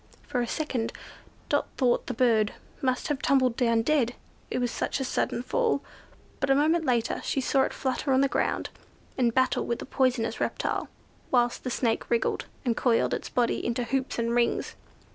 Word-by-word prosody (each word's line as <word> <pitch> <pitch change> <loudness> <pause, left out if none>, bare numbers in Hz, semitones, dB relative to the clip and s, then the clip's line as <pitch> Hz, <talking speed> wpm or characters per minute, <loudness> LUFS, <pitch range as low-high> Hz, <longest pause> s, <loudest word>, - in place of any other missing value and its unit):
For 255 -4 -2
a 240 - -1
second, 255 -5 -2 0.5
Dot - - +1
thought 245 -3 +2
the 250 - -3
bird 225 -4 +3 0.3
must 255 -1 0
have 290 -1 -1
tumbled 255 -3 +3
down 230 -3 +2
dead, 245 -3 +2 0.3
it - - -2
was 245 -1 0
such - - -2
a - - -1
sudden 245 -1 -1
fall; 455 - +1 0.6
but 275 - 0
a 270 - +5
moment 320 +3 +3
later 240 -4 +1
she - - 0
saw 270 +1 +2
it - - -3
flutter 265 +1 -2
on 260 0 +4
the 275 - +4
ground, - - -1 0.4
in 250 -3 +3
battle 260 +2 +2
with 235 - 0
the - - -7
poisonous 255 -4 0
reptile, - - -1 0.4
whilst 240 -1 +2
the 255 - -2
Snake 235 -2 0
wriggled, 235 -1 0 0.2
and 235 -2 +2
coiled 235 -1 +2
its - - -3
body 240 -1 +1
into 235 +1 -1
hoops 265 +3 -2
and 235 0 0
rings. 240 0 +1
250 Hz, 185 wpm, -27 LUFS, 235-270 Hz, 0.6 s, a